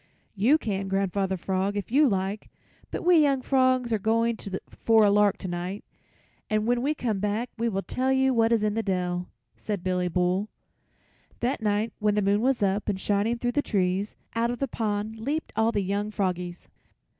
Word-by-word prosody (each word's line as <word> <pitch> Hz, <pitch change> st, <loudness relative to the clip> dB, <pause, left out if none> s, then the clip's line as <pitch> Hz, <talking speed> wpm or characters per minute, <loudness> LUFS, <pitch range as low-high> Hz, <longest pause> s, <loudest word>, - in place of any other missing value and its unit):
"You 230 Hz, +9 st, +4 dB
can, 195 Hz, -8 st, -3 dB
Grandfather 195 Hz, 0 st, 0 dB
Frog, 190 Hz, +3 st, -1 dB
if 205 Hz, -, -4 dB
you 285 Hz, +2 st, +5 dB
like, 195 Hz, +1 st, -2 dB, 0.4 s
but -, -, -4 dB
we 355 Hz, -2 st, +6 dB
young 275 Hz, -3 st, +2 dB
frogs 255 Hz, -3 st, +2 dB
are 220 Hz, -, +1 dB
going 230 Hz, +2 st, +1 dB, 0.5 s
for 225 Hz, -2 st, +5 dB
a 200 Hz, -, +4 dB
lark 205 Hz, -1 st, +3 dB
tonight, 180 Hz, +2 st, -5 dB, 0.7 s
and 215 Hz, 0 st, +1 dB
when 240 Hz, +1 st, +1 dB
we 295 Hz, +4 st, 0 dB
come 225 Hz, -8 st, -2 dB
back 210 Hz, +4 st, -1 dB
we 235 Hz, 0 st, 0 dB
will 195 Hz, -2 st, -2 dB
tell 260 Hz, +1 st, -1 dB
you 265 Hz, 0 st, +3 dB
what 225 Hz, -1 st, +3 dB
is 225 Hz, -2 st, +3 dB
in 210 Hz, -1 st, +1 dB
the 225 Hz, -, 0 dB
dell," 180 Hz, -3 st, -2 dB, 0.3 s
said 205 Hz, -4 st, -4 dB
Billy 180 Hz, -1 st, 0 dB
Bull. 180 Hz, +4 st, 0 dB, 0.9 s
That 245 Hz, 0 st, -1 dB
night 210 Hz, +1 st, 0 dB
when 210 Hz, -1 st, +2 dB
the 210 Hz, -, +1 dB
moon 200 Hz, +2 st, +2 dB
was 255 Hz, -3 st, +1 dB
up 200 Hz, +2 st, 0 dB
and 195 Hz, -2 st, -1 dB
shining 205 Hz, +4 st, 0 dB
through 245 Hz, +1 st, -1 dB
the 290 Hz, -, +1 dB
trees, 195 Hz, -3 st, -1 dB, 0.2 s
out 230 Hz, +1 st, +1 dB
of 245 Hz, -, -2 dB
the 275 Hz, -, -1 dB
pond 215 Hz, -1 st, -3 dB
leaped 290 Hz, +8 st, -3 dB
all 225 Hz, +1 st, +2 dB
the 205 Hz, -3 st, 0 dB
young 200 Hz, +2 st, -1 dB
froggies. 180 Hz, -4 st, -3 dB
210 Hz, 190 wpm, -26 LUFS, 195-235 Hz, 0.9 s, we